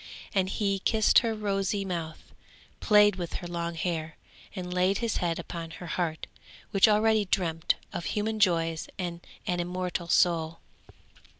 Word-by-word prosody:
And 190 -1 +1
he 195 -1 0
kissed 220 +2 +4
her 225 -2 -1
rosy 200 -1 -1
mouth, 165 -4 -5 0.5
played 210 -2 +5
with 175 -2 -5
her 175 - -5
long 170 -1 -3
hair, 160 -1 -3 0.4
and 180 -2 -5
laid 185 +2 +2
his 230 -2 -1
head 170 -3 -1
upon 165 -1 -6
her 170 +2 -9
heart, 165 -1 -2 0.5
which 195 +1 +5
already 215 0 +3
dreamt 165 -4 0 0.2
of 170 - -4
human 215 +1 -1
joys 165 -5 +2
and 175 -2 -4 0.2
an 180 -4 -1
immortal 180 0 -3
soul. 165 -2 +2
180 Hz, 145 wpm, -28 LUFS, 170-205 Hz, 0.5 s, played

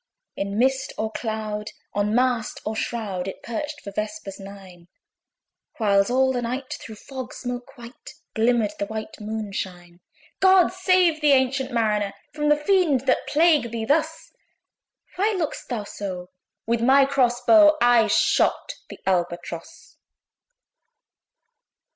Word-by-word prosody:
In 200 +1 -3
mist 265 +2 +1
or 220 0 -2
cloud, 215 -2 -4 0.2
on 205 +1 0
mast 245 -3 0
or 215 - -2
shroud, 205 -5 -3
It 190 - -7
perched 295 +5 -5
for 200 - -8
vespers 210 -1 -5
nine; 190 -3 -12 0.9
Whiles 200 -2 +3
all 260 +1 +2
the 245 - -1
night, 255 +3 -4
through 220 - -10
fog 260 +3 -8
smoke 245 +2 -6
white, 240 +5 -12 0.2
Glimmered 225 -2 +2
the 200 - -2
white 220 0 -7
Moon 215 -1 -4
shine. 175 -2 -6 0.4
"God 375 -2 +5
save 365 -4 +2
thee, 295 -1 +5
ancient 265 0 +1
Mariner! 210 -4 0 0.2
From 300 0 0
the 295 - +5
fiends, 305 -5 +2
that 270 - +1
plague 305 -5 +3
thee 225 -1 -4
thus! 315 +5 0 0.9
Why 415 +3 +1
look'st 320 -4 -4
thou 235 -5 -3
so?" 185 -3 -7 0.3
With 230 0 0
my 270 +3 +5
cross 255 -3 +1
bow 310 -2 +7
I 240 -2 +5
shot 205 - +2 0.2
the - - -10
ALBATROSS. 175 - -3
235 Hz, 135 wpm, -24 LUFS, 210-275 Hz, 0.9 s, bow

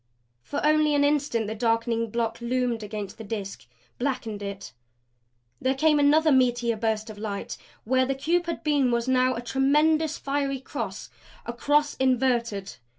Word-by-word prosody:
For 290 - -3
only 305 -1 +3
an 285 - +3
instant 285 -6 +1
the 215 - -3
darkening 230 0 0
block 230 +1 -2
loomed 240 -1 -1
against 210 -1 -6
the - - -6
Disk; 200 - -6 0.3
blackened 240 -5 -3
it. 200 -6 -7 0.9
There 265 +1 +1
came 300 +2 +3
another 305 +2 +4
meteor 245 -3 +2
burst 220 0 -1
of 210 - -12
light. 205 -2 -4 0.3
Where 260 +2 +2
the 270 - -1
cube 340 +5 0
had 335 - -4
been 290 -4 +2
was 235 0 0
now 255 0 +3
a 235 - -4
tremendous, 300 +5 +2
fiery 275 -1 -2
cross 265 - -6 0.3
a 235 - -4
cross 290 +4 +2
inverted. 240 -6 0
255 Hz, 155 wpm, -26 LUFS, 225-285 Hz, 0.9 s, another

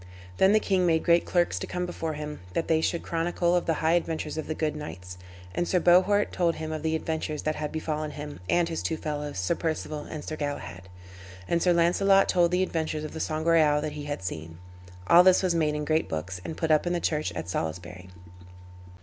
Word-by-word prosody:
Then 190 - +5
the 215 - +5
king 190 -4 +1
made 160 -1 +2
great 170 0 +4
clerks 175 -1 +1
to - - -5
come 180 0 -3
before 165 -2 -4
him, 150 0 -6
that 165 - -1
they 160 -1 +2
should 170 +1 -1
chronicle 170 +1 0
of 175 - 0
the 165 - +2
high 160 - +4
adventures 165 -3 -1
of 155 - -4
the 155 - -3
good 155 -1 -1
knights. 90 - -8 0.4
And 175 - -1
Sir 180 - +2
Bohort 185 +4 +4
told 170 -2 +1
him 155 0 -5
of 155 -1 -4
the 160 +1 0
adventures 160 -2 -3
that 155 0 -1
had 150 -1 -3
befallen 155 -1 -3
him, 150 0 -8
and 175 -1 +3
his 165 - -3
two 160 - -2
fellows, 150 -4 -4
Sir 90 -1 +1
Perceval 155 -2 -3
and 150 -2 -6
Sir 155 - -5
Galahad. 95 - -5 0.6
And 170 - +1
Sir 180 - +3
Launcelot 195 +3 +4
told 175 -1 +3
the 180 +1 +1
adventures 160 -3 -2
of 155 - -5
the 160 - -6
Sangreal 155 -1 +2
that 150 0 -3
he 145 0 -7
had 145 -9 -4
seen. 80 -2 -6 0.5
All 170 - +8
this 185 +1 +5
was 185 -2 +2
made 155 -3 +1
in 150 0 -3
great 155 +1 +1
books, 90 +3 -4
and 160 - -6
put 160 -2 0
up 155 +3 +3
in 175 - 0
the 175 - 0
church 155 -2 -1
at 80 0 -5
Salisbury. 90 +2 -5
160 Hz, 225 wpm, -27 LUFS, 150-170 Hz, 0.6 s, All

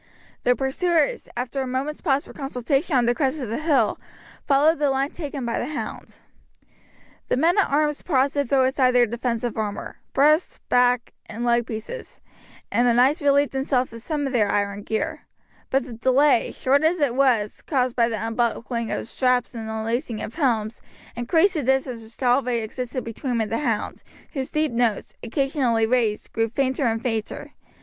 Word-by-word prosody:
The 245 - +3
pursuers, 300 +4 0
after 250 +2 -2
a 260 - -3
moment's 270 +4 -3
pause 280 -3 +1
for - - -12
consultation 275 +2 -1
on 245 - +3
the 240 - +3
crest 275 +3 0
of 250 -6 -4
the 230 - -2
hill, 285 -9 +2 0.5
followed 295 +3 +4
the 290 -2 +2
line 270 +1 0
taken 285 -5 -5
by 235 - -1
the 245 - -3
hound. 300 0 -6 1.1
The - - +1
men 330 +6 +3
at 400 - +2
arms 295 +1 +1
paused 275 -4 +1
to 285 - +1
throw 265 0 +2
aside 260 -1 +2
their 245 -1 +6
defensive 235 0 -2
armour, 210 -2 -4 0.2
breast, 305 +5 +3
back, 245 -1 +2
and 225 +2 -5
leg 235 -1 +2
pieces, 225 - -7 0.5
and 245 +1 +3
the 235 - +3
knights 270 +7 +4
relieved 285 0 +3
themselves 265 -2 0
of 230 - -9
some 295 +2 -2
of 270 - -3
their 210 -4 +2
iron 200 0 -1
gear; 220 +1 -3 0.4
but 270 0 +2
the 250 -1 -9
delay, 260 +3 +3
short 275 +2 +1
as 335 +3 +2
it 285 -5 +2
was, 245 -6 +1
caused 255 -4 0
by 235 -1 +3
the 225 - -2
unbuckling 235 0 -1
of - - -3
straps 250 -1 +1
and 225 -2 -6
unlacing 225 +1 -2
of 220 - -6
helms, 235 -7 0 0.3
increased 320 +11 +2
the 310 - -1
distance 260 -2 0
which 225 +3 -11
already 250 -1 +2
existed 250 +3 -4
between 245 +3 -4
them 230 - +1
and 215 - -3
the 230 - 0
hound, 230 -8 -2 0.3
whose 265 -4 -3
deep 305 -2 0
notes, 235 -3 0
occasionally 250 -2 +1
raised, 225 -3 0
grew 225 0 0
fainter 265 +2 0
and 225 0 -1
fainter. 225 -3 -3
255 Hz, 185 wpm, -23 LUFS, 230-280 Hz, 1.1 s, their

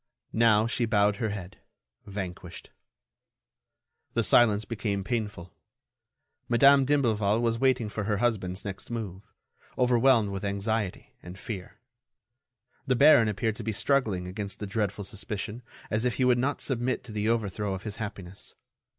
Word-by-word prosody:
Now, 110 -1 +4
she 120 +1 0
bowed 105 -1 +2
her 110 -3 -1
head—vanquished. 90 - -9 1.4
The - - +2
silence 110 -3 +4
became 105 -4 -3
painful. 105 -6 -4 1.0
Madame 135 +3 +6
d'Imblevalle 110 -7 +2
was 115 -1 0
waiting 130 -3 +2
for 105 0 -4
her 105 -1 0
husband's 100 -5 -1
next 100 -1 -6
move, 105 -5 -6 0.5
overwhelmed 125 -3 +3
with 95 0 -5
anxiety 100 0 -2
and 90 +2 -10
fear. 100 -3 -7 1.1
The 130 - +2
baron 130 -3 +6
appeared 105 +1 -1
to 115 - -6
be 110 - -2
struggling 105 -7 +1
against 100 +2 -4
the 105 - -4
dreadful 100 0 -2
suspicion, 105 +2 -5 0.3
as 110 +1 +1
if 125 -1 0
he 130 - +1
would 125 -1 +4
not 140 +3 -1
submit 130 -1 0
to 125 - -9
the 105 +1 -1
overthrow 105 -3 -1
of 95 - -8
his 105 0 -5
happiness. 100 -4 -8
105 Hz, 140 wpm, -27 LUFS, 100-120 Hz, 1.4 s, Madame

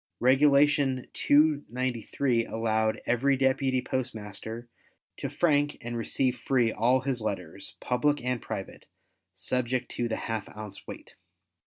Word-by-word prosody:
Regulation 140 0 +4
293, 130 -4 +1
allowed 110 -1 0
every 135 +3 +2
deputy 130 -1 +1
postmaster 115 -2 -5 0.5
to - - -4
frank 145 -3 +1
and 120 0 -5
receive 125 +2 0
free 120 -3 +2
all 125 +5 +2
his 130 -3 -2
letters, 95 -4 -5
public 145 +4 +1
and 125 -2 -1
private, - - -7 0.5
subject 125 +6 -1
to 120 - -2
the 110 - -1
½ 110 -2 -5
ounce 105 -2 -9
weight. - - -10
125 Hz, 120 wpm, -28 LUFS, 115-135 Hz, 0.5 s, Regulation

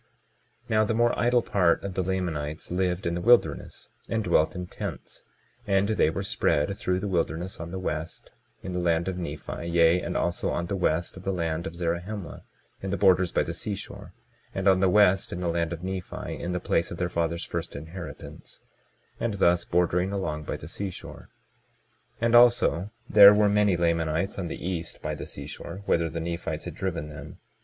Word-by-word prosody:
22:28 - - -39 0.6
Now, 110 0 +4
the 110 - 0
more 120 +1 +2
idle 120 0 +3
part 90 -4 +2
of 100 - -4
the 95 - 0
Lamanites 85 -6 -3
lived 90 +1 0
in 85 - 0
the 85 - -2
wilderness, 120 +4 +2 0.2
and 110 -1 0
dwelt 85 -3 +2
in 90 0 -4
tents; - - -7 0.4
and 100 +1 +2
they 110 -7 +3
were 95 +5 -3
spread 95 -2 +1
through 90 -1 -1
the 100 - -3
wilderness 90 0 -2
on 80 +1 -6
the 95 - -5
west, 85 -3 -5 0.3
in 95 - -5
the 90 - -1
land 85 0 +1
of 95 -1 -3
Nephi; 85 +1 -5
yea, 85 +1 +4
and - - -3
also 85 0 -1
on 85 - -1
the 100 - -3
west 85 -1 0
of 90 - -10
the 95 - -1
land 85 -1 -2
of 80 - -7
Zarahemla, 85 +3 -4 0.4
in 95 - -4
the - - -1
borders 90 -2 +4
by - - +2
the - - -4
seashore, 100 -2 -6 0.4
and 95 0 -1
on 95 -1 +5
the 95 0 +3
west 95 -1 +4
in 90 - -4
the 90 - -2
land 85 0 0
of 85 0 -6
Nephi, 95 -1 -5
in 90 - -4
the 90 - -1
place 85 -1 0
of 85 - -6
their 90 - 0
fathers' 85 0 -2
first - - -5
inheritance, 80 +5 -9 0.6
and 115 -3 -1
thus 85 -2 +3
bordering 90 +2 +1
along 75 -6 -3
by - - -3
the 75 - -10
seashore. 95 +2 -7 0.9
22:29 115 - 0
And 115 0 +3
also 120 -6 +5 0.2
there 100 -1 +9
were 105 0 +4
many 105 -2 +3
Lamanites 85 +2 0
on 90 - -2
the 85 - -5
east 85 -3 -4
by - - -2
the - - -6
seashore, 95 +4 -8
whither 85 -3 +2
the 85 - -4
Nephites 85 +1 -4
had - - -5
driven 85 -5 -3
them. 75 - -10
90 Hz, 200 wpm, -27 LUFS, 85-95 Hz, 0.9 s, there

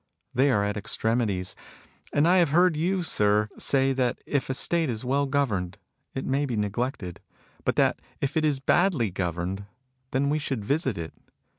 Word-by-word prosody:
They 135 +3 +3
are 105 -6 +2
at 105 0 -2
extremities. 105 -3 -1 0.6
And 145 +3 +3
I 180 +2 +5
have 170 -4 +4
heard 175 +2 +4
you, 180 +4 0
sir, 105 -7 +2
say 135 -1 +3
that 125 -2 0
if 140 -2 -1
a 130 - 0
State 165 +2 +1
is 115 0 -4
well 140 +2 +1
governed 105 -10 -1 0.4
it 130 - -3
may 140 +2 0
be 120 -4 -2
neglected; 105 - -3 0.5
but - - +1
that - - +2 0.2
if 140 +1 -2
it 160 - +2
is 150 -3 +2
badly 145 - +2
governed, 90 +2 -3 0.4
then 140 +2 +1
we 155 - +1
should 135 -8 -3
visit 140 - 0
it. 80 -1 -6
130 Hz, 175 wpm, -26 LUFS, 105-145 Hz, 0.6 s, I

